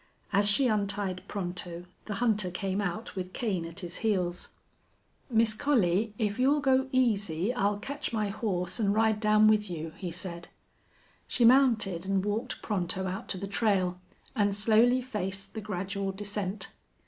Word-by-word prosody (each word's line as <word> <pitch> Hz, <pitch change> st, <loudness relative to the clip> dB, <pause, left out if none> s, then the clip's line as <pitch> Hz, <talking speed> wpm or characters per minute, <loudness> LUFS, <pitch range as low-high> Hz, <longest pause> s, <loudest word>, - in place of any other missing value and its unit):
As 200 Hz, +1 st, +5 dB
she 260 Hz, +7 st, +4 dB
untied 200 Hz, -3 st, -1 dB
Pronto 175 Hz, -2 st, -3 dB, 0.2 s
the 210 Hz, -, -4 dB
hunter 210 Hz, -4 st, +1 dB
came 190 Hz, +2 st, -2 dB
out 200 Hz, +4 st, -4 dB
with 185 Hz, -1 st, -5 dB
Kane 190 Hz, -8 st, -2 dB
at 170 Hz, +3 st, -8 dB
his 175 Hz, -1 st, -4 dB
heels. 180 Hz, -5 st, -1 dB, 0.8 s
"Miss 225 Hz, -2 st, +3 dB
Collie, 215 Hz, -5 st, +1 dB
if 210 Hz, -2 st, -1 dB
you'll 280 Hz, +4 st, +4 dB
go 265 Hz, -1 st, +2 dB
easy 210 Hz, -, +1 dB
I'll 205 Hz, -3 st, +1 dB
ketch 280 Hz, +7 st, -4 dB
my 215 Hz, -3 st, -1 dB
horse 195 Hz, -2 st, -2 dB
an' 200 Hz, -2 st, +2 dB
ride 220 Hz, 0 st, +2 dB
down 215 Hz, 0 st, +5 dB
with 210 Hz, -2 st, +3 dB
you," 160 Hz, -2 st, -5 dB
he 185 Hz, -, -4 dB
said. 170 Hz, -1 st, -6 dB, 0.8 s
She 240 Hz, -, +2 dB
mounted, 230 Hz, -8 st, +4 dB
and 195 Hz, 0 st, +1 dB
walked 220 Hz, +5 st, -3 dB
Pronto 190 Hz, -2 st, -1 dB
out 185 Hz, +1 st, -4 dB
to -, -, 0 dB
the 195 Hz, -, -4 dB
trail, 195 Hz, -3 st, 0 dB, 0.4 s
and 205 Hz, -3 st, +2 dB
slowly 230 Hz, +4 st, +4 dB
faced 195 Hz, -5 st, -4 dB
the 220 Hz, -, -5 dB
gradual 195 Hz, 0 st, -3 dB
descent. 200 Hz, 0 st, -4 dB
205 Hz, 160 wpm, -29 LUFS, 185-220 Hz, 0.8 s, As